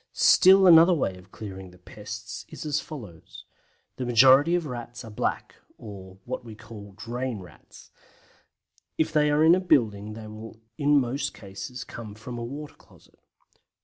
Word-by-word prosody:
Still 190 +1 +6
another 170 0 +7
way 95 - -1
of 90 +1 -17
clearing 95 -3 -9
the 90 - -18
pests 105 +3 -9
is - - -9
as 150 -1 -1
follows: 105 - -11 0.5
The 130 - -3
majority 135 +7 +6
of 175 -2 -1
Rats 120 -2 -7
are 110 - -10
Black, 105 - -3 0.2
or 95 -3 -11
what - - -5
we 115 -2 -10
call 105 -3 -12
Drain 120 +2 -5
Rats; 90 -4 -16 1.1
if 155 -1 0
they 150 -1 +3
are 150 +1 +3
in 160 +1 +7
a 185 - +3
building 110 - +1
they 110 0 -9
will 110 +1 -10 0.2
in 145 +1 +3
most 130 +2 -3
cases 100 +5 -8
come 110 -5 -9
from 120 +2 -8
a - - -5
water 145 +5 -7
closet. - - -23
115 Hz, 165 wpm, -26 LUFS, 105-145 Hz, 1.1 s, another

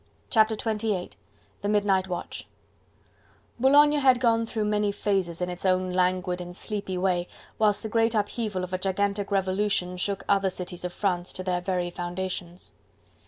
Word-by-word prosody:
Chapter 220 -1 +4
XXVIII: 215 -4 -2 0.5
The 205 - -1
Midnight 200 -3 +2
Watch 175 -2 -5 1.1
Boulogne 290 +3 +6
had 260 -3 +5
gone 230 -2 +2
through 220 -2 -2
many 210 -1 +1
phases, 190 -4 -1
in 180 - -2
its 180 - -7
own 185 -1 +2
languid 180 0 +1
and 175 0 -8
sleepy 200 -3 -3
way, 180 -1 +1 0.3
whilst 210 -1 +3
the - - -2
great 225 +1 +2
upheaval 210 -2 -1
of 185 0 -6
a 185 - 0
gigantic 200 +1 -1
revolution 190 -2 +1
shook 195 +2 -2
other 195 -1 +3
cities 180 -1 -6
of 180 - -3
France 180 -2 -1
to 185 - -5
their 180 -1 -1
very 180 -1 -1
foundations. 175 0 -5
195 Hz, 160 wpm, -26 LUFS, 180-210 Hz, 1.1 s, Boulogne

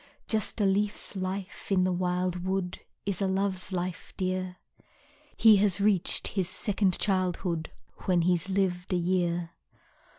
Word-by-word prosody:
Just 220 0 0
a 205 - +3
leaf's 205 +2 0
life 190 +1 -5
in 185 -2 +4
the 185 - +2
wild 180 0 -1
wood, 190 -1 -2 0.3
Is 200 0 -2
a 195 - +2
love's 190 -1 -1
life, 180 -1 -4
dear. 185 -1 -2 0.8
He 220 -2 +7
has 195 -1 +2
reached 200 -3 +2
his 190 -3 -1
second 195 -2 +2
childhood 180 -4 0 0.4
When 180 -3 +3
he's 180 +1 +1
lived 185 -2 0
a - - +3
year. 175 -1 0
185 Hz, 140 wpm, -28 LUFS, 180-195 Hz, 0.8 s, He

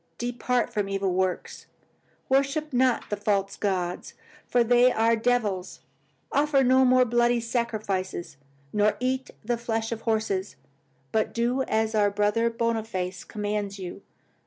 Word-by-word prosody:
Depart 245 0 -1
from 205 -3 -1
evil 195 -1 0
works. 185 0 -2 0.6
Worship 275 +3 +1
not 250 -2 +2
the - - +1
false 200 -1 0
gods, 180 -3 -2 0.3
for 245 -1 +3
they 245 +2 +5
are 225 0 +3
devils. 220 -6 -1 0.5
Offer 285 -1 +3
no 260 +1 +5
more 255 0 +5
bloody 240 0 +2
sacrifices, 215 - -3 0.4
nor 210 0 +2
eat 260 +1 -1 0.2
the 240 +1 0
flesh 225 -1 -2
of 225 -1 -4
horses, 215 - -1 0.6
but 220 - 0
do 240 +3 +1
as 220 0 0
our 210 -2 +3
Brother 210 +3 +1
Boniface 220 -6 -2
commands 205 -1 -3
you. 185 0 -7
225 Hz, 135 wpm, -26 LUFS, 200-245 Hz, 0.6 s, they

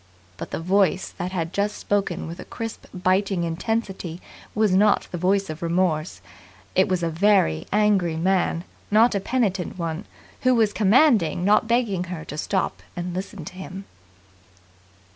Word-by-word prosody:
But - - -6
the - - -4
voice 190 +2 +2
that 180 +1 -3
had 170 -2 -3
just 205 +1 -1
spoken 200 -3 -1
with 165 +2 -7
a - - -6
crisp, 225 -1 -7
biting 185 0 +1
intensity 180 0 -3 0.4
was 215 -2 +3
not 205 +2 +3
the 175 - -3
voice 195 +2 +2
of 155 +1 -7
remorse. 170 -2 0 0.5
It 190 +2 +4
was 180 -2 0
a 165 - +1
very 165 - +2
angry 200 -5 +2
man, 175 -1 +1 0.3
not 220 +3 +5
a 200 - +1
penitent 195 -5 -1
one, 170 +2 -3 0.4
who 255 0 +4
was 220 -3 +3
commanding 210 - +3
not 210 +2 +4
begging 230 -6 +1
her 175 -3 -6
to 150 - -7
stop 190 +4 -1
and 175 0 -4
listen 185 -3 -6
to - - -8
him. 190 +1 -8
190 Hz, 160 wpm, -24 LUFS, 175-205 Hz, 0.5 s, not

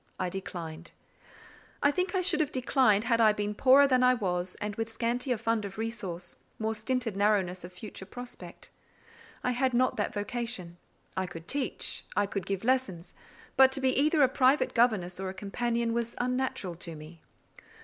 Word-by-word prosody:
I 185 - 0
declined. 170 -3 -7 0.9
I 285 - +5
think 365 +4 -1
I 370 - +2
should 355 - +2
have 305 -3 +1
declined 255 -5 +3
had 230 -1 +2
I 215 -1 +6
been 210 0 -2
poorer 265 +5 +6
than 255 -2 +3
I 255 0 +5
was, 180 -4 -2
and 210 -1 -4
with 225 0 -3
scantier 245 +2 -1
fund 225 0 0
of 200 0 -7
resource, 195 -6 -5 0.2
more 220 0 -1
stinted 225 0 -2
narrowness 195 -3 +1
of 175 - -8
future 190 +1 -9
prospect. 245 +4 -9 0.7
I 250 - +1
had 255 0 +1
not 255 +1 +2
that 205 - 0
vocation. 205 -5 -3 0.4
I 185 0 -1
could 165 -2 -9
teach; 280 -2 -1
I 205 - +3
could 195 -2 -4
give 195 0 -2
lessons; 225 -9 0 0.4
but 265 -1 +7
to 270 - 0
be 265 -1 +2
either 300 +2 +4
a - - +7
private 260 +2 +3
governess 210 -7 +2
or 190 0 -3
a 190 - -7
companion 235 +3 -1
was 235 0 -2
unnatural 250 -7 -1
to 170 -1 -6
me. 155 +2 -12
225 Hz, 180 wpm, -29 LUFS, 190-255 Hz, 0.9 s, but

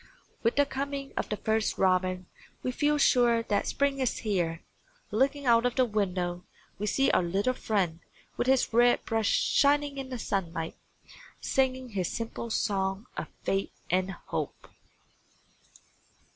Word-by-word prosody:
With 230 - +1
the 285 - +4
coming 275 0 -4
of - - -2
the 210 - -2
first 220 +1 0
robin 185 -1 +1 0.4
we 255 - 0
feel 295 +3 +1
sure 240 -4 +4
that 205 -2 0
spring 280 -1 0
is 260 -2 0
here. 175 -5 0 0.5
Looking 275 +5 +1
out 230 -1 +5
of 245 -1 0
the 255 - +4
window, 180 -5 -1 0.4
we 210 - -2
see 270 +6 +3
our - - +3
little 195 +8 0
friend 190 -9 -1 0.4
with - - -1
his 260 -3 +3
red 240 +1 +4
breast 225 -2 +1
shining 285 0 +2
in 265 -1 -6
the 255 - -4
sunlight, 170 -7 -2 0.7
singing 260 -1 0
his 190 -5 -2
simple 230 0 -4
song 195 -1 -1
of - - -4 0.2
faith 195 0 -2
and 185 +1 +2
hope. - - -5
225 Hz, 145 wpm, -29 LUFS, 190-260 Hz, 0.7 s, out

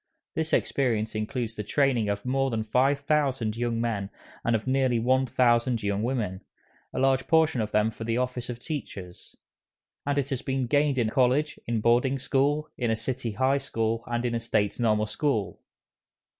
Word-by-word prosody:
This 160 0 -2
experience 115 -5 +1
includes 110 +2 -3
the 105 - -5
training 125 -2 +1
of 100 +2 -2
more 135 +1 +1
than 115 -3 -1
five 135 +6 +2
thousand 135 -7 0
young 120 -1 -1
men 110 -4 -1 0.3
and 115 - +2
of 110 - -2
nearly 130 -2 +2
one 130 +3 +2
thousand 120 -1 +2
young 100 0 0
women, 110 -6 -2 0.5
a - - -7
large 130 0 +2
portion 160 -6 +3
of 105 - -2
them 105 +1 +2
for 115 - -8
the 115 +1 -1
office 125 -1 -2
of 120 - -4
teachers; 105 - -7 0.7
and 145 0 -1
it 140 -1 0
has 130 - -1
been 135 -1 -1
gained 145 +1 +2
in 115 -3 +1
College, 135 +4 +2
in 115 -2 0
Boarding 125 +4 +3
School, 145 +3 +1
in 120 -2 0
a 115 - +2
city 120 0 -3
High 130 +5 +2
School, 115 -4 -2
and 120 +1 -1
in 120 - 0
a 115 - 0
State 110 -2 0
Normal 110 -2 +2
School. 105 - -1
120 Hz, 185 wpm, -27 LUFS, 110-135 Hz, 0.7 s, portion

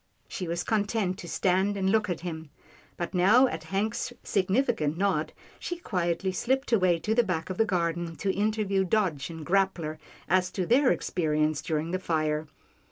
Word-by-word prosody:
She 180 - -5
was 170 +1 -2
content 205 -3 0
to 175 - -8
stand 190 +3 +1
and 190 -1 0
look 215 -1 +2
at 175 -2 -2
him, 160 -3 -6 0.5
but 175 - -4
now 205 +8 +6
at 160 -11 -3
Hank's 215 +7 -2
significant 190 - +1
nod, 180 -5 0 0.3
she 350 - -4
quietly 180 - -1
slipped 265 +8 -1
away 185 -6 +4
to 210 +7 -1
the 240 - +5
back 180 -5 -2
of 185 - -6
the 225 - +5
garden, 170 -2 -1
to 195 +3 -1
interview 205 -2 +1
Dodge 180 -8 0
and 160 -2 -8
Grappler 180 -5 0 0.3
as 185 0 +2
to 185 - -1
their 255 +6 +4
experiences 155 -3 0
during 160 -1 -2
the 185 - -1
fire. 155 -3 -1
185 Hz, 170 wpm, -28 LUFS, 165-205 Hz, 0.5 s, now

